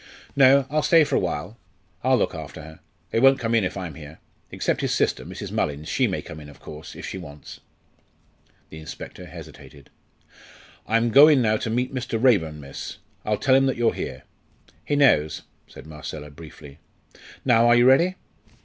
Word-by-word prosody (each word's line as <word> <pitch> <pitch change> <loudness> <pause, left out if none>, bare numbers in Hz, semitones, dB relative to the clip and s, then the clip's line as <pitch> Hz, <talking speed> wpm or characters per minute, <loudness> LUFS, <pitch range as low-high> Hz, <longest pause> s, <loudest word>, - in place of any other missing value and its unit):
"No, 135 0 +6
I'll 155 +1 +1
stay 160 +2 +5
for 145 - -1
a - - +3
while. 90 +4 -4 0.4
I'll 130 0 +3
look 105 - 0
after 80 -1 -8
her. 80 +1 -12 0.3
They - - +1
won't 135 +2 +6
come 115 -2 -2
in 115 -3 +3
if 95 - -3
I'm 90 -4 -5
here. 75 +1 -11 0.3
Except - - -2
his - - 0
sister - - 0
Mrs. - - -8
Mullins 75 +1 -2
she - - +1
may - - -3
come - - -10
in, 75 -1 -11
of 70 - -16
course, 75 +1 -10
if - - -8
she 95 - -6
wants." 75 -4 -11 1.1
The 80 - -9
inspector 80 - -9
hesitated. 70 -1 -13 1.0
"I'm 115 +1 +1
going 145 +3 +7
now 110 -3 +2
to 115 - -4
meet 125 +3 -1
Mr. 125 -3 -3
Raeburn, 90 -12 +2
miss. 70 -1 -8 0.3
I'll 105 0 0
tell 130 - +2
him 135 0 +4
that 130 - -1
you're 120 -1 +2
here." - - -6 0.6
"He 145 - -1
knows," 80 - +3 0.2
said - - -13
Marcella, 75 -1 -8
briefly. 75 -1 -13 0.7
"Now 120 -2 +4
are 120 - +6
you 120 0 +5
ready?" 170 +8 +4
110 Hz, 185 wpm, -23 LUFS, 75-130 Hz, 1.1 s, going